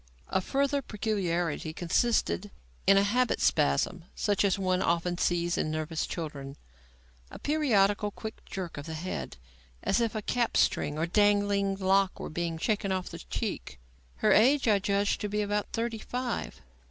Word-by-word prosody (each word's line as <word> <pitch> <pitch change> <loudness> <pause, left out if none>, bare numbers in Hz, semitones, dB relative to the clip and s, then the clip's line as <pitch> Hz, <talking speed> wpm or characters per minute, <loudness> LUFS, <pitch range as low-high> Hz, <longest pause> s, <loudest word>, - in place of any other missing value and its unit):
A 190 - +1
further 280 +6 0
peculiarity 175 - -2
consisted 205 +3 +1 0.4
in 195 - +7
a 195 - +5
"habit 245 +4 +1
spasm," 165 - +1
such 205 -1 +1
as 200 -2 +2
one 185 -1 +1
often 175 +1 0
sees 175 0 +1
in - - 0
nervous 155 +1 -2
children; 145 -4 -6 0.7
a - - -9
periodical 210 -9 +2
quick 220 +2 -8
jerk 185 -5 -6
of 145 - -8
the 160 - -5
head, 175 - -5 0.5
as 195 - +2
if 230 -1 0
a 215 - -3
cap 240 +1 0
string 145 - +1
or 160 - +1
dangling 205 +1 +2
lock 195 0 +2
were - - -6
being 170 0 -2
shaken 205 +2 0
off 185 -1 -2
the - - -8
cheek. 60 0 -5 0.4
Her 60 - +2
age 265 +5 +5
I 210 -2 +4
judged 200 +1 0
to 210 - -2
be 210 +1 0
about 205 0 -2
thirty 230 -1 -2
five. 245 - -4
195 Hz, 165 wpm, -29 LUFS, 170-215 Hz, 0.7 s, in